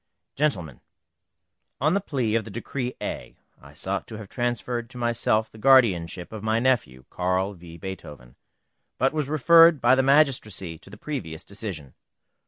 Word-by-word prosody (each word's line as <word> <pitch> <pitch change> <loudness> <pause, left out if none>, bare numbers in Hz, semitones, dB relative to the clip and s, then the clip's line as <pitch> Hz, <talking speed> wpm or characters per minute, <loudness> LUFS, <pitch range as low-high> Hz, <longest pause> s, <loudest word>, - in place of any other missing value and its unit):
GENTLEMEN, 90 - -1 1.0
On 155 +5 +2
the 200 - +1
plea 130 - -1
of 115 0 +1
the - - -10
Decree 125 +3 -4
A, - - -6 0.2
I 70 +1 -15
sought - - -3
to 110 - -8
have 105 -3 -10
transferred 120 -1 -2
to 130 - -11
myself 115 -2 0
the 110 - -14
guardianship 100 -9 +3
of 110 - -6
my 110 +1 +1
nephew, 115 - 0
Carl 95 +2 0
v. 85 -2 -12
Beethoven, 75 -9 -9 0.6
but 135 +3 +2
was 150 -3 -2
referred 165 +2 +6
by 120 +1 +4
the 130 - +4
magistracy 125 - +2
to - - -17
the 105 - -12
previous 100 - -6
decision. 95 - -7
110 Hz, 160 wpm, -25 LUFS, 90-130 Hz, 1.0 s, referred